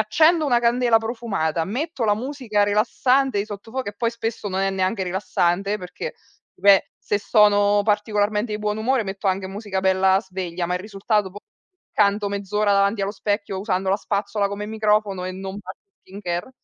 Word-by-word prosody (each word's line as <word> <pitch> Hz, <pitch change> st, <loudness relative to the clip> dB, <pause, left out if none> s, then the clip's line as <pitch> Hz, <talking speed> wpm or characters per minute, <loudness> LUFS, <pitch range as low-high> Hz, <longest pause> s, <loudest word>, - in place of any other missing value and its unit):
accendo 310 Hz, +10 st, +4 dB
una 240 Hz, -3 st, +3 dB
candela 235 Hz, -1 st, +3 dB
profumata, 225 Hz, -9 st, -2 dB
metto 265 Hz, -, -3 dB
la 210 Hz, -1 st, +3 dB
musica 245 Hz, -4 st, -1 dB
rilassante 250 Hz, +4 st, +2 dB
di 200 Hz, -, 0 dB
sottofondo 225 Hz, +4 st, -6 dB
e -, -, -22 dB
poi 230 Hz, +1 st, 0 dB
spesso 225 Hz, -2 st, -4 dB
non 190 Hz, 0 st, -2 dB
è 195 Hz, 0 st, +1 dB
neanche 190 Hz, +1 st, -1 dB
rilassante 185 Hz, +2 st, 0 dB
perché 180 Hz, -, -7 dB, 0.4 s
beh, 195 Hz, +1 st, +4 dB
se 205 Hz, -, -1 dB
sono 205 Hz, -1 st, +4 dB
particolarmente 210 Hz, +1 st, 0 dB
di 210 Hz, -, -2 dB
buon 210 Hz, 0 st, -2 dB
umore 245 Hz, +1 st, +1 dB
metto 195 Hz, +1 st, -5 dB
anche 190 Hz, 0 st, -1 dB
musica 195 Hz, -1 st, -4 dB
bella 190 Hz, 0 st, +3 dB
sveglia, 180 Hz, -3 st, -4 dB
ma 180 Hz, -, -1 dB
il 180 Hz, -, -2 dB
risultato 205 Hz, 0 st, -1 dB
poi 205 Hz, +2 st, -10 dB, 0.5 s
canto 205 Hz, 0 st, +2 dB
mezz'ora 200 Hz, +1 st, 0 dB
davanti 200 Hz, +1 st, +2 dB
allo 195 Hz, -, -1 dB
specchio 205 Hz, -2 st, -2 dB
usando 190 Hz, -2 st, -1 dB
la 195 Hz, -, +3 dB
spazzola 200 Hz, 0 st, -1 dB
come 200 Hz, +1 st, -5 dB
microfono 210 Hz, -3 st, 0 dB
e 185 Hz, -, -3 dB
non 190 Hz, +1 st, -6 dB
faccio 190 Hz, -, -12 dB
skin 195 Hz, +2 st, -11 dB
care. 175 Hz, +4 st, -3 dB
205 Hz, 175 wpm, -22 LUFS, 190-220 Hz, 0.5 s, accendo